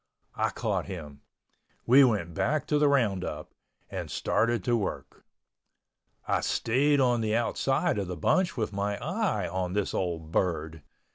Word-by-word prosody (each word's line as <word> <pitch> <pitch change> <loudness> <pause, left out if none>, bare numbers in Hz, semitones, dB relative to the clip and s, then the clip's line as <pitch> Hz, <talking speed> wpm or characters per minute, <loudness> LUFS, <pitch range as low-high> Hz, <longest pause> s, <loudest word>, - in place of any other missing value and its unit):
I - - 0
caught - - -2
him. 75 -7 -8 0.6
We 135 +4 +7
went 105 -9 +1
back 145 - 0
to 150 - +1
the 150 - +4
roundup 110 -10 0 0.4
and - - -6
started 115 -3 0
to 120 - +2
work. 105 -5 -4 1.0
I - - +1
stayed 140 +5 +2
on 125 -3 +3
the 110 0 0
outside 120 -1 0
of 100 - -3
the 90 -1 -5
bunch 175 - +1
with 110 -3 -2
my 100 +1 -1
eye 160 - -1
on 90 -1 -3
this 105 -1 -1
old 85 -3 -3
bird. 80 -3 -1
105 Hz, 150 wpm, -28 LUFS, 90-130 Hz, 1.0 s, We